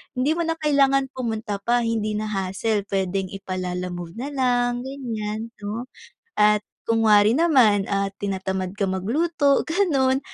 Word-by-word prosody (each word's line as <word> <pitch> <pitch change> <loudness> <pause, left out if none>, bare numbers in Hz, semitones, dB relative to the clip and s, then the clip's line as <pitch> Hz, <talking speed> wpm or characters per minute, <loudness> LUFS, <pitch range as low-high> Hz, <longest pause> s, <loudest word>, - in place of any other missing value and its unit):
Hindi 260 +4 +1
mo 335 - 0
na 330 - 0
kailangan 275 -3 +2
pumunta 220 -5 -3
pa, 240 +3 +1
hindi 220 -2 -1
na 215 0 -3
hassle, 195 +2 -1
pwedeng 195 0 -1
ipa-Lalamove 180 -2 -5
na 270 +5 -5
lang, 245 -1 0
ganyan, 225 -4 -5
'no? 210 +3 -4 0.5
At 210 0 +4 0.2
kunwari 220 -2 +4
naman, 250 - +4
ah, 195 0 0
tinatamad 190 -1 -3
ka 205 - -2
magluto, 280 - +1
ganoon, 290 -7 +2
220 Hz, 135 wpm, -23 LUFS, 195-265 Hz, 0.5 s, At